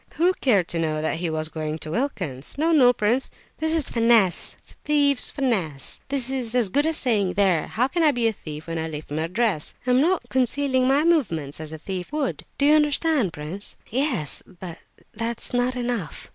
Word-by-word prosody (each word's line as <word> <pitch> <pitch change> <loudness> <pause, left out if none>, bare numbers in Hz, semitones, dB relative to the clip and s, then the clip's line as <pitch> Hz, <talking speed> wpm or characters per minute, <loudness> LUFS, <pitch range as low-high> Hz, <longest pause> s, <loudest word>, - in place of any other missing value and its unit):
Who 355 +3 +3
cared 200 -10 +3
to 170 - 0
know 155 -2 -1
that 155 +1 -1
he 170 0 -1
was 155 0 0
going 155 -1 -4
to 155 -1 -5
Wilkin's? 175 - -3
No, 320 +3 +2
no! 265 -6 +6
prince, 240 +3 0 0.3
this 315 0 0
is 320 -3 +1
finesse, 230 -6 +3 0.3
thieves' 285 -3 +3
finesse! 190 - -1
This 265 -2 0
is 250 -3 -2
as 240 -5 +2
good 285 +10 +1
as 320 - 0
saying, 205 -7 +1
'There, 185 -5 +2
how 245 +4 0
can 340 +5 -1
I 315 - +6
be 245 -3 0
a 225 - 0
thief 155 -5 -9
when 165 -1 -4
I 160 - -2
leave 150 -2 -7
my 155 +2 -1
address? 190 -3 -1
I'm 250 +1 +3
not 355 +4 +1
concealing 260 0 +1
my 275 +3 +3
movements 170 - +1
as 155 -1 -6
a 160 - -6
thief 180 - -6
would.' 300 -4 -2
Do 280 - +2
you 295 - +6
understand, 295 - +2
prince?" 160 +7 -4
"Oh - - -31
yes, 245 - +1
but 180 -2 -10 0.3
that 230 +1 -3
is - - -5
not 245 +1 +1
enough." 240 -8 -4
230 Hz, 205 wpm, -24 LUFS, 165-275 Hz, 0.3 s, no